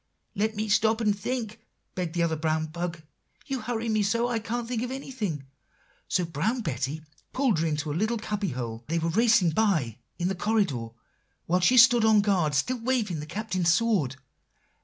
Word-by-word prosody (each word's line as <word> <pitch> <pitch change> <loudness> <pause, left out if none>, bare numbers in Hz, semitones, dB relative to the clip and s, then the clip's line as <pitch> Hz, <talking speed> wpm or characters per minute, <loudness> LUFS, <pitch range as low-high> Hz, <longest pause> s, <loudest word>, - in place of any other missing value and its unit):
"'Let 215 +2 -1
me 215 +1 -2
stop 220 +2 +3
and 210 -3 +2
think,' 225 +1 -4 0.3
begged 175 -2 -4
the 170 - +2
other 165 -1 +1
brown 155 0 0
bug; 170 0 -5 0.4
'you 270 -3 -3
hurry 235 0 -3
me 215 -1 +1
so 230 +4 +1
I 240 -2 -1
can't 230 +2 -4
think 240 -2 -2
of 245 - -3
anything.' 225 - -4 0.6
So 180 - +1
Brown 170 - -1
Betty 150 - -3 0.3
pulled 255 - +2
her 165 - +1
into 150 -1 -2
a - - -2
little 220 +8 0
cubby 210 -2 -2
hole, 120 -3 -5
they 165 +2 0
were 165 0 0
racing 220 -3 +4
by, 155 - +1 0.2
in 175 - -1
the 190 - 0
corridor, 185 - 0 0.6
while 180 +2 +2
she 215 +8 +4
stood 240 -1 +7
on 220 -1 +5
guard, 180 -8 +1
still 250 - 0
waving 225 -8 -1
the 150 - -7
Captain's 185 -2 0
sword. 175 - +1
200 Hz, 185 wpm, -27 LUFS, 160-225 Hz, 0.6 s, stood